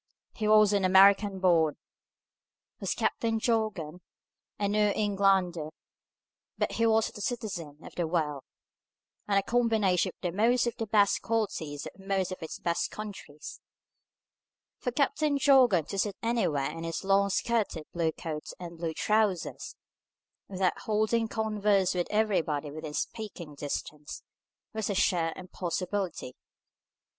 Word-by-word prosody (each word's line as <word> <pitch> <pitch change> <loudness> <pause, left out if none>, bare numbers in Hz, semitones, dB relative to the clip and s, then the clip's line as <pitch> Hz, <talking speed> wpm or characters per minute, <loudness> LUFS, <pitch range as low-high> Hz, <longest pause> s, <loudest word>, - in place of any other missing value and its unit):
He 215 - -2
was 215 -1 +6
an 200 -1 +2
American 195 +1 +5
born, 165 -5 +3 1.0
was - - -2
Captain 225 -1 0
Jorgan, 210 -8 -1 0.6
a 205 - 0
New 210 0 +2
Englander, 195 -6 +1 0.9
but - - 0
he 230 0 +1
was 220 0 +2
a 210 - -7
citizen 190 - -4
of - - -11
the 170 -2 -1
world, 155 -4 -1 0.9
and 200 -1 +2
a 195 - +3
combination 220 -6 +2
of 175 -2 -1
most 235 +5 +3
of 235 - -2
the 225 - -3
best 205 -1 +3
qualities 180 -10 -2
of - - -10
most 195 -1 -1
of 185 - -6
its 160 - -6
best 170 -1 -1
countries. 200 -8 -9 1.2
For 250 - -2
Captain 285 +2 +1
Jorgan 255 - +5
to 195 - -3
sit 200 0 0
anywhere 195 -12 0
in 165 - -7
his 165 +3 -4
long 200 +1 +3
skirted 200 -6 -1
blue 165 -2 +1
coat 155 -1 -6
and 170 -2 -8
blue 165 -2 -3
trousers, 210 -4 0 0.7
without 185 -1 0
holding 220 +1 +1
converse 210 -3 +1
with 175 -1 -1
everybody 165 -9 0
within 155 0 -7
speaking 190 -8 -5
distance, 145 +1 -6 0.5
was 220 -1 -2
a 200 - -1
sheer 170 -3 +2
impossibility. 185 -4 -4
195 Hz, 135 wpm, -29 LUFS, 170-215 Hz, 1.2 s, was